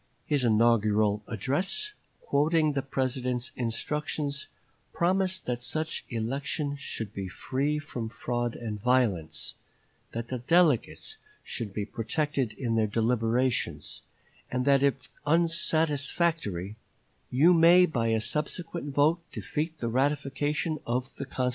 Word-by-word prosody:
His 145 -4 +1
inaugural 110 -2 +3
address, 180 - 0 0.3
quoting 155 +1 +2
the 140 - 0
President's 130 -2 -1
instructions, 140 +4 -2 0.5
promised 185 +1 +1
that 120 -1 -2
such 155 +6 -2
election 140 +5 -2
should 115 -7 -5
be 95 -1 -4
free 135 +10 -1
from 125 -7 -5
fraud 120 0 -2
and 105 -3 -5
violence; 105 -11 +1 0.6
that 115 +1 -5
the 130 - -3
delegates 170 - +2 0.3
should 115 -5 -4
be 100 +1 -3
protected 130 +2 -1
in 115 -1 -2
their 110 -1 +2
deliberations; 115 +3 0 0.5
and 125 0 0
that 140 -1 +5
if 140 -1 +1 0.2
unsatisfactory, 160 - +1 0.5
"you 155 +8 +5
may 175 +2 +7
by 120 -9 -1
a 110 0 +2
subsequent 150 +2 -2
vote 155 +4 +4
defeat 160 +2 -3
the 120 - -3
ratification 145 +4 0
of 125 +2 -1
the 140 - -4
constitution." 130 -1 -1
130 Hz, 120 wpm, -28 LUFS, 115-150 Hz, 0.6 s, may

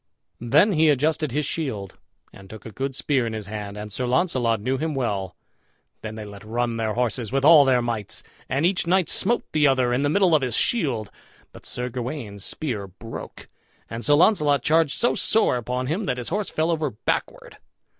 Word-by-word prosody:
Then 145 - +4
he 160 -3 +3
adjusted 150 +1 +1
his 150 +3 -1
shield, 110 - -3 0.4
and 95 -1 -14
took 110 - -11
a 110 - -8
good 135 +3 -4
spear 130 -5 0
in 115 - -4
his 110 -2 -5
hand, 105 0 -6
and 105 -1 -7
Sir 125 +4 -2
Launcelot 125 - +1
knew 130 +5 -2
him 155 -1 -2
well. 100 -7 -2 0.7
Then 110 0 -6
they 110 - -6
let 100 -1 -11
run 115 +1 -2
their 110 -1 -2
horses 120 -2 -1
with 135 +1 +1
all 155 -2 +8
their 125 -2 +3
mights, 115 -4 -3 0.3
and 140 +5 +1
each 180 -1 +1
knight 180 -1 +2
smote 240 - +1
the 150 -1 +3
other 130 -2 +2
in 125 - +1
the 145 - +1
middle 185 +1 +3
of 155 - +4
his 125 -3 -1
shield. 125 - 0 0.4
But - - -9
Sir 125 0 -3
Gawain's 120 -5 -5
spear 115 -10 -3
broke, 115 +5 -10 0.4
and 115 +1 -5
Sir 145 - +4
Launcelot 150 - +3
charged 160 -2 +3
so 240 - +3
sore 220 - +2
upon 125 +2 -3
him 170 +10 -2
that 125 -5 -1
his 125 - -5
horse 205 +3 -2
fell 160 +2 0
over 155 -3 -1
backward. 105 - -4
130 Hz, 200 wpm, -23 LUFS, 115-155 Hz, 0.7 s, all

